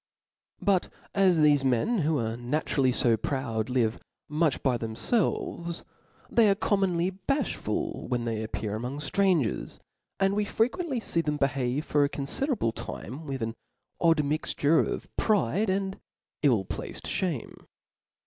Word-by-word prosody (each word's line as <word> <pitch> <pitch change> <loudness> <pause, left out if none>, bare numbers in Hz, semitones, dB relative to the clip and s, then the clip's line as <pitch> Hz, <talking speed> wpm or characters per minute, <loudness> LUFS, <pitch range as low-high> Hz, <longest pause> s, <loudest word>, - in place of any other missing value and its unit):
But 195 -3 +2 0.2
as 190 -3 +4
thefe 150 -3 +5
men, 135 - +2
who 155 -1 +1
are 115 -2 -1
naturally 130 +1 0
fo 120 -2 +4
proud, 115 -2 -2
live 120 -3 +1 0.3
much 155 -1 +1
by 130 -3 +3
themfelves, 170 - -1 0.4
they 230 -3 +4
are 195 - +4
commonly 190 -3 +1
balh 275 +10 -1
ful - - -3
when 120 -2 -1
they 110 -2 -2
appear 110 -1 -3
among 125 +5 -4
ftrangers; 160 - +1 0.4
and 195 0 +3
we 210 - +2
frequently 255 - 0
fee 170 -6 0
them 150 -2 -1
behave 140 0 0
for 145 -1 +3
a 140 - +2
confiderable 145 - 0
time 135 +10 -7
with 135 -4 -3
an 115 0 -2 0.5
odd 165 -3 +4
mixture 150 +1 +2
of - - -1
pride 200 - +2
and 190 0 -1 0.4
ill 120 -10 +3
placed - - -6
fhame. 170 -10 -2
150 Hz, 140 wpm, -28 LUFS, 125-190 Hz, 0.5 s, thefe